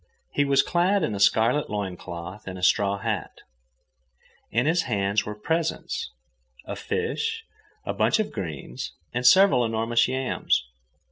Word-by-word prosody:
He 145 - +1
was 140 -1 +4
clad 180 +2 +2
in 115 - -1
a 100 - -4
scarlet 115 +8 +3
loin 100 -3 -3
cloth 85 +4 -8
and 95 -1 -5
a 90 - -9
straw 100 +1 +3
hat. 100 - -4 1.1
In 120 +4 +1
his 165 +3 +3
hands 100 -1 +1
were 105 - -4
presents—a 160 +9 -4
fish, 450 0 -2 0.4
a - - -2
bunch - - +2
of 215 - -1
greens, 75 - -6 0.2
and 125 +1 +2
several 185 -6 +6
enormous 115 +1 +1
yams. 130 - 0
115 Hz, 140 wpm, -25 LUFS, 100-150 Hz, 1.1 s, several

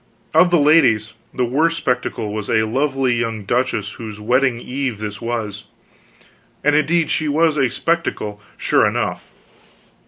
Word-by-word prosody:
Of 180 - +5
the 175 - +4
ladies, 120 -9 +4 0.2
the 125 - -1
worst 160 +7 +1
spectacle 125 -5 -2
was 105 -1 -4
a 110 -1 +3
lovely 135 +2 0
young 115 -3 -2
duchess, 110 -2 -1
whose 110 -2 -8
wedding 125 +2 +1
eve 130 -2 -3
this 105 -1 -6
was; 110 -3 -4 1.0
and 150 0 +3
indeed 160 +2 +2
she 155 - 0
was 155 +1 +2
a 135 -4 +2
spectacle, 120 -9 -2 0.2
sure - - +3
enough. - - -3
125 Hz, 145 wpm, -19 LUFS, 110-150 Hz, 1.0 s, Of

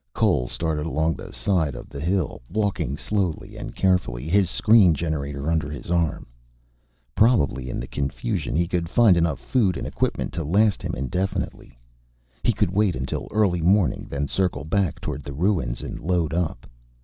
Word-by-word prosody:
Cole - - +2
started 80 +1 -2
along 80 0 +1
the - - -9
side 80 -9 0
of - - -8
the 70 - -8
hill, 90 +2 -1
walking 100 - -1
slowly 95 -5 -2
and - - -7
carefully, 85 -9 +1
his 95 +1 +3
screen 105 -3 +5
generator 75 -3 -3
under 80 -2 0
his 75 +2 -7
arm. 85 -4 0 0.9
Probably 70 - +2
in - - -3
the 60 - -4
confusion 70 -2 -3
he 85 +2 +2
could 85 -2 -1
find 110 -2 +5
enough 85 -1 +1
food 105 -9 +1
and - - -4
equipment - - -2
to 85 -1 -2
last 100 +7 +2
him - - -3
indefinitely. 90 +7 -3 0.6
He - - +3
could - - 0
wait 100 -1 +2
until 65 0 -4
early 95 -5 +2
morning, 95 +2 +2
then 70 0 -2
circle 90 -4 -1
back 90 +1 0
toward 75 - -4
the 70 0 -7
ruins 80 -7 0
and - - -6
load 85 -1 0
up. 80 -8 -2
85 Hz, 170 wpm, -24 LUFS, 70-95 Hz, 0.9 s, screen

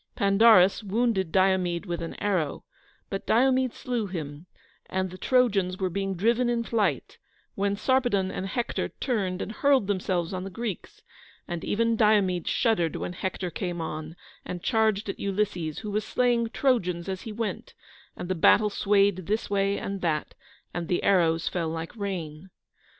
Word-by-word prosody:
Pandarus 200 0 +5
wounded 205 -4 0
Diomede 185 -1 +2
with 175 -2 -4
an 165 - -5
arrow, 180 -8 -1 0.5
but 195 - -4
Diomede 260 +1 +3
slew 240 -4 -2
him, 155 -2 -6 0.4
and 185 -1 -2
the 185 - -9
Trojans 200 -8 +2
were 185 -1 -1
being 195 +1 -2
driven 235 +6 +2
in 235 -1 0
flight, 225 -3 -1 0.3
when 200 0 0
Sarpedon 235 -5 +1
and 190 - -4
Hector 235 +4 -2
turned 195 -8 -2
and - - -6
hurled 270 0 +3
themselves 185 -3 -1
on 185 0 -3
the 195 - -5
Greeks; 215 -1 -6 0.4
and 175 -1 -4
even 230 +2 +1
Diomede 205 -5 +2
shuddered 175 -9 +1
when 175 - -4
Hector 185 -1 -4
came 175 0 -4
on, 155 0 -5 0.3
and 175 -1 -6
charged 220 -3 +1
at 195 - -4
Ulysses, 190 -6 -2
who 210 -2 -5
was 210 +1 0
slaying 240 -1 +1
Trojans 185 -10 0
as 190 -1 -4
he 225 - -7
went, 220 0 -4 0.4
and - - -5
the 185 - 0
battle 210 +4 +4
swayed 200 -3 +2
this 215 0 -1
way 200 0 +1
and 195 -1 -4
that, 155 -3 -1 0.4
and 175 -1 -3
the 175 - 0
arrows 170 -4 +3
fell 170 -3 -1
like 165 +3 -5
rain. 185 -5 -5
195 Hz, 160 wpm, -27 LUFS, 180-220 Hz, 0.5 s, Pandarus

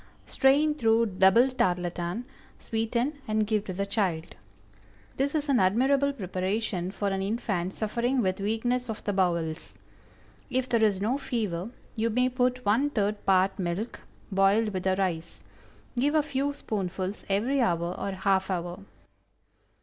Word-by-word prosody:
Strain 285 +3 +3
through 230 -5 +3
double 195 +5 +4
tarlatan, 175 -1 -1 0.3
sweeten, 235 +6 -2
and 215 0 +1
give 210 -1 0
to 190 - -4
the 200 +2 -2
child. 190 -6 -1 0.8
This 280 +3 0
is 300 -1 0
an 275 -3 +3
admirable 265 +9 +3
preparation 190 -3 -2
for 200 +1 -2
an 195 0 -1
infant 195 -3 -2
suffering 235 +4 0
with 190 -4 0
weakness 235 +4 -1
of 220 - -5
the 205 - -1
bowels. 170 -4 -1 0.7
If 255 -1 0
there 235 -3 +2
is 205 -3 +3
no 235 +8 0
fever, 210 -8 -2 0.3
you 230 0 0
may 250 +3 +2
put 250 -1 0
one 235 +8 +3
third 210 -5 -1
part 190 0 +3
milk, 185 +6 -3 0.3
boiled 195 +3 +3
with 185 -2 -4
the 190 0 +3
rice. 170 -4 -3 0.5
Give 285 +5 +1
a 305 - +4
few 285 0 -1
spoonfuls 195 -5 -3
every 240 +8 +1
hour 170 -4 +1
or - - -3
half 190 0 +1
hour. 175 -1 -3
210 Hz, 150 wpm, -28 LUFS, 185-245 Hz, 0.8 s, double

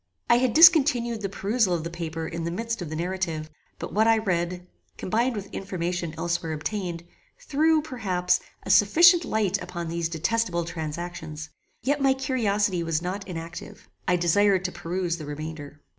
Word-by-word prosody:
I 235 - +6
had 250 -2 +1
discontinued 270 -9 +6
the 195 - -2
perusal 200 -1 +1
of 165 - -3
the 170 - -5
paper 165 -1 -5
in 165 0 -5
the 170 - -2
midst 230 +4 -3
of 170 - -5
the 155 - -5
narrative; 165 -3 -3 0.3
but - - -7
what 220 +2 +3
I 225 0 +5
read, 180 -3 -2 0.3
combined 235 +6 0
with 200 -1 -7
information 175 -3 -3
elsewhere 165 -1 -2
obtained, 170 +1 -4 0.4
threw, 315 - +2
perhaps, 185 - 0 0.2
a - - -1
sufficient 340 - +6
light 205 -3 0
upon 170 -2 -5
these 170 0 -2
detestable 175 +1 -1
transactions; 160 -1 -6 0.3
yet 285 +3 0
my 270 -1 +4
curiosity 210 -8 0
was 165 0 -1
not 190 +3 -4
inactive. 170 -1 -8 0.2
I 180 - +3
desired 185 +2 +3
to 180 - -1
peruse 175 0 -3
the 155 - -7
remainder. 150 -1 -7
180 Hz, 165 wpm, -25 LUFS, 165-225 Hz, 0.4 s, I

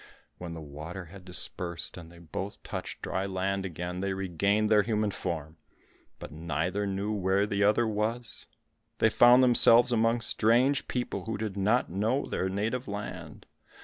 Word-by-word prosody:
When 85 -2 -6
the 80 - -7
water 80 +5 -8
had 95 -3 -12
dispersed 90 -1 -3
and 85 -2 -11
they 85 - -15
both 85 +4 -7
touched - - -6
dry 95 +1 -2
land 95 0 -2
again, 90 +1 -5
they 95 0 -1
regained 100 +3 0
their 105 -1 +6
human 105 0 0
form, 80 -4 -5 0.6
but - - -9
neither 85 +6 -2
knew 100 +2 -2
where 100 -1 +1
the 105 0 0
other 105 +3 +3
was; 110 +2 -3 0.5
they 110 - +3
found 120 +3 +6
themselves 120 0 +6
among 115 0 +2
strange 120 +6 +3
people, 125 -1 -3
who 110 -1 -3
did 105 -2 -4
not 105 +4 +1
know 110 +9 0
their 95 - -2
native 110 +6 -2
land. 100 0 -7
100 Hz, 160 wpm, -28 LUFS, 90-110 Hz, 0.6 s, their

